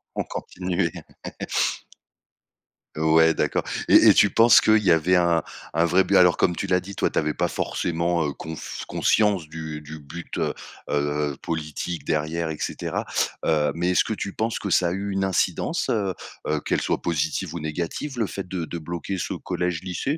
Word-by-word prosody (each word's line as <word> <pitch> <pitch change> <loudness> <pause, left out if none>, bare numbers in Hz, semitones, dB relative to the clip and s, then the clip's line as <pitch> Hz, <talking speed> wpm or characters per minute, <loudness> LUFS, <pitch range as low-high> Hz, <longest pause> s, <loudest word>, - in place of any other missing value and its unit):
Ont - - 0
continué. 90 -2 -2 2.0
Ouais 80 +1 +4
d'accord - - 0 0.2
et - - +7
et - - +8
tu - - +5
penses 115 +1 +6
qu'il 110 0 +5
y 90 - +4
avait 80 +3 +4
un 85 -2 +3 0.3
un 85 - +3
vrai 90 +3 +4
but? 100 +2 +1
Alors 90 -2 +6
comme 90 -2 +2
tu - - -3
l'as 90 -1 +3
dit, 100 +2 -9
toi, - - +1
tu - - -6
avais 75 0 +1
pas 90 0 0
forcément, 85 0 -1
heu, 70 - -3
conf 80 +3 -7
conscience 100 -7 +2
du 80 -1 -6
du 75 +1 -9
but, 80 +4 -8
heu - - 0 0.4
heu 75 0 0
heu, - - -8
politique 80 -1 -4
derrière, 80 +2 -1
et 75 - -5
cetera, - - -3 0.4
heu, 75 -2 +2
mais 90 +2 0
est-ce - - +4
que 110 - -3
tu 100 -1 -4
penses 110 +1 -2
que 100 - -4
ça 90 0 +3
a - - -3
eu 100 +2 -3
une 95 0 0
incidence, 95 -2 0
heu 100 -4 0 0.3
heu, 75 -1 +1
qu'elle - - 0
soit - - -1
positive 80 0 -1
ou 85 - -3
négative, 85 - -4
le 110 - +1
fait 95 -1 -6
de 90 -3 -3
de 85 - -6
bloquer 85 +4 -4
ce - - -3
collège 90 -2 -2
lycée? 115 - -2
85 Hz, 195 wpm, -24 LUFS, 80-95 Hz, 2.0 s, et